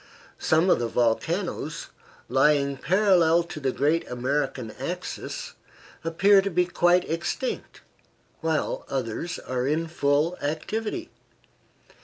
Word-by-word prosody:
Some 165 Hz, +4 st, +3 dB
of -, -, +4 dB
the 120 Hz, -, -1 dB
volcanoes 155 Hz, -, -1 dB, 0.4 s
lying 140 Hz, 0 st, +3 dB
parallel 175 Hz, 0 st, +3 dB
to 170 Hz, -2 st, -8 dB
the 135 Hz, -3 st, 0 dB
great 150 Hz, +6 st, +1 dB
American 130 Hz, -1 st, -2 dB
axis -, -, -5 dB, 0.5 s
appear 195 Hz, +5 st, +5 dB
to 200 Hz, -, -2 dB
be 180 Hz, -1 st, +2 dB
quite 180 Hz, 0 st, +3 dB
extinct, 170 Hz, -, -3 dB, 0.6 s
while 160 Hz, -2 st, -1 dB
others 135 Hz, +6 st, -3 dB
are 130 Hz, 0 st, -3 dB
in 155 Hz, +3 st, +1 dB
full 155 Hz, +2 st, +1 dB
activity. 215 Hz, -, -3 dB
160 Hz, 110 wpm, -26 LUFS, 140-180 Hz, 0.6 s, appear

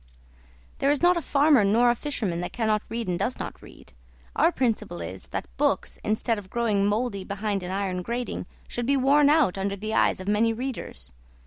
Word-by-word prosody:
There 275 Hz, -, +2 dB
is 290 Hz, +2 st, +1 dB
not 355 Hz, +1 st, +6 dB
a 340 Hz, -, -1 dB
farmer 285 Hz, -5 st, +4 dB
nor 230 Hz, +5 st, +4 dB
a -, -, 0 dB
fisherman 210 Hz, -11 st, -3 dB
that 175 Hz, -, -4 dB
cannot 220 Hz, -3 st, 0 dB
read 230 Hz, -1 st, -3 dB
and 175 Hz, -1 st, -1 dB
does 250 Hz, -, -1 dB
not -, -, -7 dB
read. -, -, -16 dB, 0.4 s
Our 330 Hz, +3 st, +4 dB
principle 230 Hz, -, -1 dB
is, 90 Hz, +3 st, -7 dB
that -, -, -4 dB
books, -, -, 0 dB
instead 215 Hz, +1 st, 0 dB
of 190 Hz, -2 st, -13 dB
growing 215 Hz, -4 st, +1 dB
mouldy 210 Hz, -2 st, -1 dB
behind 200 Hz, 0 st, -2 dB
an 180 Hz, -, -6 dB
iron 190 Hz, -1 st, -2 dB
grating, 235 Hz, +5 st, -4 dB, 0.2 s
should 240 Hz, 0 st, -4 dB
be 280 Hz, 0 st, +3 dB
worn 280 Hz, +2 st, +4 dB
out 295 Hz, -, +3 dB
under 200 Hz, +1 st, -1 dB
the 215 Hz, +2 st, -5 dB
eyes -, -, +3 dB
of 185 Hz, -, -8 dB
many 220 Hz, +2 st, +2 dB
readers. 220 Hz, -, -6 dB
220 Hz, 200 wpm, -26 LUFS, 195-255 Hz, 0.4 s, not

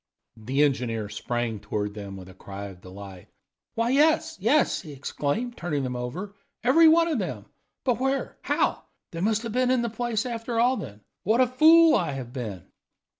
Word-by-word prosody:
The 130 Hz, +6 st, +1 dB
engineer 115 Hz, -7 st, -1 dB
sprang 120 Hz, -1 st, -3 dB
toward 105 Hz, 0 st, -3 dB
them 100 Hz, -2 st, -8 dB
with 90 Hz, -1 st, -10 dB
a 95 Hz, -, -12 dB
cry 100 Hz, +2 st, -8 dB
of 90 Hz, -2 st, -14 dB
delight. 95 Hz, 0 st, -11 dB, 0.5 s
"Why, 230 Hz, +1 st, +1 dB
yes, 320 Hz, +3 st, +3 dB
yes," 270 Hz, +7 st, +2 dB
he 150 Hz, -, -10 dB
exclaimed, 150 Hz, -, -3 dB
turning 150 Hz, -5 st, -2 dB
them 125 Hz, -1 st, -3 dB
over, 160 Hz, +12 st, -5 dB, 0.3 s
"every 310 Hz, +7 st, +6 dB
one 330 Hz, +1 st, +5 dB
of 310 Hz, -7 st, 0 dB
them! 190 Hz, -, -4 dB, 0.4 s
But 250 Hz, -3 st, +1 dB
where 270 Hz, +1 st, -1 dB
how -, -, 0 dB, 0.3 s
they 165 Hz, -, -5 dB
must 220 Hz, +3 st, +1 dB
have 230 Hz, -, -4 dB
been 250 Hz, +2 st, +1 dB
in 255 Hz, -2 st, +2 dB
the 235 Hz, -, -1 dB
place 230 Hz, -1 st, -2 dB
after 230 Hz, -1 st, -3 dB
all, 250 Hz, +3 st, +4 dB
then? 105 Hz, -, -8 dB, 0.2 s
What 220 Hz, +5 st, +2 dB
a 255 Hz, -, +6 dB
fool 315 Hz, +6 st, +6 dB
I 165 Hz, -5 st, +1 dB
have 125 Hz, -3 st, -7 dB
been!" 110 Hz, -9 st, -6 dB
185 Hz, 185 wpm, -26 LUFS, -, 0.5 s, every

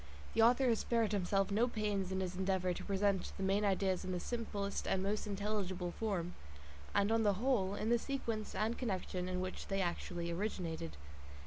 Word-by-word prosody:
The 225 Hz, -, +4 dB
author 245 Hz, +3 st, +6 dB
has 230 Hz, -2 st, +3 dB
spared 230 Hz, -3 st, +1 dB
himself 195 Hz, 0 st, +1 dB
no 225 Hz, +4 st, +3 dB
pains 210 Hz, -5 st, -1 dB
in 190 Hz, 0 st, 0 dB
his 185 Hz, -1 st, -2 dB
endeavour 185 Hz, -1 st, +1 dB
to -, -, -6 dB
present 200 Hz, -1 st, +1 dB
the 195 Hz, -, -3 dB
main 195 Hz, +2 st, +2 dB
ideas 190 Hz, -2 st, +2 dB
in 185 Hz, -, -3 dB
the 180 Hz, -, -1 dB
simplest 205 Hz, -3 st, -3 dB
and 190 Hz, 0 st, +1 dB
most 210 Hz, +2 st, -1 dB
intelligible 195 Hz, -3 st, -1 dB
form, 185 Hz, -6 st, -1 dB, 0.6 s
and 200 Hz, +1 st, +3 dB
on 225 Hz, 0 st, +4 dB
the 205 Hz, -2 st, +4 dB
whole, 205 Hz, -4 st, +1 dB
in 215 Hz, +2 st, -1 dB
the 240 Hz, -, +5 dB
sequence 230 Hz, -5 st, -3 dB
and 220 Hz, +2 st, +1 dB
connection 185 Hz, -5 st, -2 dB
in 180 Hz, 0 st, -1 dB
which 185 Hz, 0 st, -4 dB
they 195 Hz, 0 st, 0 dB
actually 175 Hz, -1 st, -2 dB
originated. 170 Hz, -, -3 dB
200 Hz, 190 wpm, -36 LUFS, 185-215 Hz, 0.6 s, author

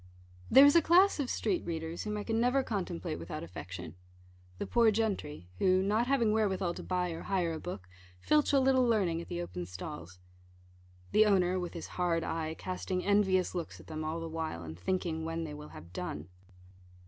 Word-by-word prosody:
There 270 Hz, +4 st, +9 dB
is 285 Hz, -, +6 dB
a 335 Hz, -, +7 dB
class 360 Hz, +3 st, +5 dB
of 270 Hz, -3 st, -1 dB
street 365 Hz, -, 0 dB
readers, 165 Hz, 0 st, -4 dB
whom 210 Hz, 0 st, -2 dB
I 205 Hz, -, -3 dB
can 225 Hz, +1 st, 0 dB
never 250 Hz, +3 st, +3 dB
contemplate 180 Hz, -7 st, -3 dB
without 85 Hz, -, -6 dB
affection 90 Hz, 0 st, -8 dB, 0.6 s
the -, -, -3 dB
poor 235 Hz, -2 st, +4 dB
gentry, 200 Hz, -, -2 dB
who, 185 Hz, 0 st, +3 dB
not 215 Hz, +5 st, +1 dB
having 245 Hz, -5 st, +3 dB
wherewithal 195 Hz, -5 st, +1 dB
to -, -, -7 dB
buy 180 Hz, -1 st, -1 dB
or 165 Hz, -, -6 dB
hire 180 Hz, -4 st, 0 dB
a 160 Hz, -, -5 dB
book, 100 Hz, -, -7 dB, 0.3 s
filch 300 Hz, -, +2 dB
a 280 Hz, -, +5 dB
little 260 Hz, -1 st, +4 dB
learning 195 Hz, -9 st, +1 dB
at -, -, -10 dB
the 175 Hz, -, -4 dB
open 90 Hz, -, -6 dB
stalls 90 Hz, -1 st, -8 dB, 0.9 s
the 215 Hz, 0 st, +5 dB
owner, 185 Hz, -2 st, +3 dB
with 175 Hz, -1 st, -5 dB
his 170 Hz, -, -5 dB, 0.2 s
hard 165 Hz, -2 st, +1 dB
eye, 160 Hz, -1 st, -3 dB
casting 185 Hz, 0 st, -3 dB
envious 190 Hz, -2 st, +3 dB
looks 175 Hz, -3 st, -5 dB
at -, -, -14 dB
them 155 Hz, 0 st, -5 dB
all 160 Hz, +2 st, -3 dB
the 165 Hz, -, -5 dB
while, 160 Hz, -, -4 dB
and 80 Hz, +1 st, -8 dB
thinking 165 Hz, -, -1 dB
when 165 Hz, +1 st, -3 dB
they 155 Hz, -2 st, -6 dB
will 150 Hz, 0 st, -9 dB
have 85 Hz, +1 st, -12 dB
done. 85 Hz, -2 st, -5 dB
180 Hz, 195 wpm, -31 LUFS, 160-215 Hz, 0.9 s, There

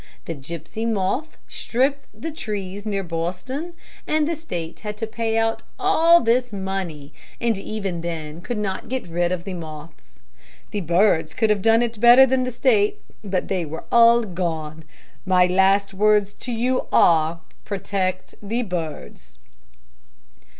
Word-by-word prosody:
The 165 Hz, -, -4 dB
gypsy 170 Hz, +10 st, -5 dB
moth 220 Hz, +10 st, -1 dB
stripped 270 Hz, +4 st, -1 dB
the 225 Hz, +10 st, -6 dB
trees 205 Hz, -, -5 dB
near 200 Hz, -2 st, -1 dB
Boston, 185 Hz, -, -4 dB, 0.3 s
and 305 Hz, -1 st, +2 dB
the 335 Hz, -, -1 dB
State 175 Hz, -, -6 dB
had 210 Hz, -1 st, -6 dB
to 225 Hz, -, -2 dB
pay 225 Hz, 0 st, -2 dB
out 225 Hz, 0 st, +1 dB, 0.2 s
all 340 Hz, -3 st, +5 dB
this 245 Hz, +2 st, +1 dB
money, 190 Hz, -7 st, -5 dB, 0.3 s
and 235 Hz, -1 st, +1 dB
even 195 Hz, -3 st, -4 dB
then 165 Hz, -1 st, -5 dB
could 225 Hz, +5 st, -4 dB
not 200 Hz, -2 st, -3 dB
get 260 Hz, 0 st, -3 dB
rid 175 Hz, +1 st, 0 dB
of 180 Hz, -2 st, -2 dB
the 195 Hz, 0 st, -5 dB
moths. 155 Hz, -, -10 dB, 0.5 s
The 205 Hz, -, -2 dB
birds 170 Hz, -1 st, +2 dB
could 220 Hz, -2 st, +2 dB
have 205 Hz, -2 st, +1 dB
done 225 Hz, +3 st, +4 dB
it 230 Hz, -2 st, -4 dB
better 240 Hz, +3 st, +8 dB
than 260 Hz, 0 st, +1 dB
the 255 Hz, -, -3 dB
State, 225 Hz, -4 st, +2 dB, 0.2 s
but 190 Hz, -3 st, -2 dB
they 185 Hz, -3 st, -1 dB
were 160 Hz, +1 st, -6 dB
all 235 Hz, 0 st, +6 dB
gone. 160 Hz, -5 st, -4 dB, 0.4 s
My 185 Hz, -1 st, +4 dB
last 195 Hz, +2 st, +3 dB
words 205 Hz, 0 st, +3 dB
to 250 Hz, -, -7 dB
you 245 Hz, +3 st, 0 dB
are, 165 Hz, 0 st, +4 dB, 0.2 s
'Protect 190 Hz, -2 st, -3 dB
the 225 Hz, +4 st, -2 dB
birds.'" 170 Hz, -7 st, -6 dB
200 Hz, 150 wpm, -22 LUFS, 175-230 Hz, 0.5 s, better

